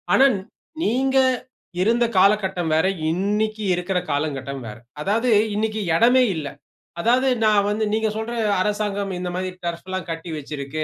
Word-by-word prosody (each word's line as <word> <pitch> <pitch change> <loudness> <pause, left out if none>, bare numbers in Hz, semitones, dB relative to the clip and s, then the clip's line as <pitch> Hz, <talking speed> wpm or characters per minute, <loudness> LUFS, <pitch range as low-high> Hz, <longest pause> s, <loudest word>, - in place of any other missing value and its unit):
ஆனா, 270 - +6 0.6
நீங்க 265 +4 +1 0.6
இருந்த 235 +4 +3
காலகட்டம் 190 -4 +2
வேற, 160 - +3 0.3
இன்னைக்கி 210 +4 -1
இருக்குற 180 +1 -1
காலங்கட்டம் 140 -2 -3
வேற. 105 0 -8 0.2
அதாவது 225 +8 +1 0.3
இன்னைக்கி 215 0 -1
இடமே 245 +7 +5
இல்லை. 150 -3 -4 0.5
அதாவது, 250 +6 +3 0.2
நான் 210 -2 +4
வந்து 210 +1 -1
நீங்க 220 0 +1
சொல்ற 220 +2 -4 0.3
அரசாங்கம் 205 -1 -1
இந்த 180 0 -3
மாதிரி 185 0 -2 0.2
டர்ஃப்ல்லாம் 185 +2 -4
கட்டி 165 +1 -5
வச்சிருக்கு. 145 +1 -5
200 Hz, 135 wpm, -22 LUFS, 165-220 Hz, 0.6 s, ஆனா